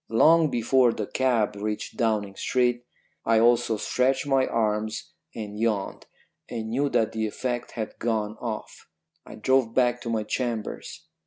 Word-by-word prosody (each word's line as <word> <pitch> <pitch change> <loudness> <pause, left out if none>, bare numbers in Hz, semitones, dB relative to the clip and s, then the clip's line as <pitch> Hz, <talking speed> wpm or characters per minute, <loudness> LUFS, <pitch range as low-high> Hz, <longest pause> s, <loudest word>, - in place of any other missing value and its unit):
Long 155 +8 +5
before 120 0 +3
the 105 - -3
cab 115 -4 +1
reached 105 +1 -4
Downing 110 -4 0
Street 120 +1 0 0.4
I 115 -1 +3
also 120 -1 +3
stretched 130 +5 +1
my 135 -2 +2
arms 110 -1 -1 0.2
and 105 -2 -6
yawned, 110 -4 -1 0.4
and 110 -2 -4
knew 140 +4 +1
that 110 -5 +1
the 110 0 -1
effect 120 +3 -4
had 110 -3 -5
gone 110 -2 -1
off. 110 -3 -6 0.4
I - - -9
drove 115 +1 +1
back 125 -1 +2
to 115 - -5
my 110 -2 0
chambers. 115 0 -4
115 Hz, 150 wpm, -26 LUFS, 110-125 Hz, 0.4 s, Long